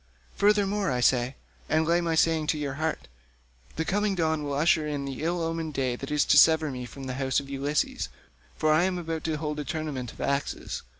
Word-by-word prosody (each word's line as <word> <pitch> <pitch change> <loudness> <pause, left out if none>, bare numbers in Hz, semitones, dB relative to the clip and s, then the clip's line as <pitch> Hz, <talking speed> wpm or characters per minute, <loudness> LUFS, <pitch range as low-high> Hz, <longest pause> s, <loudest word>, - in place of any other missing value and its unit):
Furthermore 205 -1 +2
I 125 -2 0
say—and 120 - 0
lay 170 +2 +3
my 165 -1 0
saying 160 -1 +2
to 155 - +1
your 145 -2 -3
heart—the - - -6
coming 205 +2 +1
dawn 160 -3 0
will 145 -1 -3
usher 155 +1 +3
in 145 -2 -3
the 135 0 -5
ill 170 +1 0
omened 165 -2 -3
day 130 -2 0
that 135 +2 -7
is 150 -1 +2
to 145 - +6
sever 160 -1 +5
me 125 -1 -5
from 135 +2 -10
the 130 -1 -4
house 130 -1 +2
of 140 -1 -9
Ulysses, 140 +2 -1 0.5
for 155 0 +3
I 165 +3 +4
am 185 -1 -1
about 165 -2 -4
to 160 -1 -1
hold 150 0 -3
a - - -2
tournament 140 -4 -4
of - - -17
axes. 140 0 -2
150 Hz, 205 wpm, -27 LUFS, 135-165 Hz, 0.5 s, to